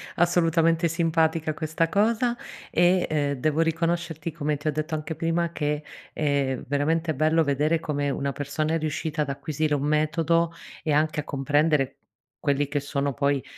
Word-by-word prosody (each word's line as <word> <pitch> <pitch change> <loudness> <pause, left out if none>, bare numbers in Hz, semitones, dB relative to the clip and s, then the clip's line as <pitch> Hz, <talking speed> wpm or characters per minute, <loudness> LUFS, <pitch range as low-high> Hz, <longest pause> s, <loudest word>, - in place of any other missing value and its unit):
Assolutamente 165 -1 +3
simpatica 160 -1 +1
questa 160 +1 -1
cosa 230 +5 +2 0.4
e, 175 +2 +3 0.3
uhm, - - -10
devo 155 +4 +1
riconoscerti 165 -1 -1
come 150 -1 -2
ti 145 - -6
ho - - +3
detto 155 +2 -2
anche 155 +1 -4
prima 165 +1 0
che, 150 -2 -2 0.3
ehm, 140 -3 0
è - - -10
veramente 160 +3 +1
bello 155 +3 +3
vedere 150 +3 +1
come 145 -2 -1
una 140 0 -1
persona, 150 +3 -2
è - - +3
riuscita 155 0 -2
ad 140 - -6
acquisire 150 +1 -1
un 140 - -2
metodo 165 +2 +1 0.3
e 155 - -1
anche 155 +1 +2
a - - -2
comprendere 145 0 +1 0.4
quelli 145 -1 +1
che 145 0 -1
sono 140 0 -2
poi, 140 0 +1
155 Hz, 165 wpm, -25 LUFS, 145-165 Hz, 0.4 s, Assolutamente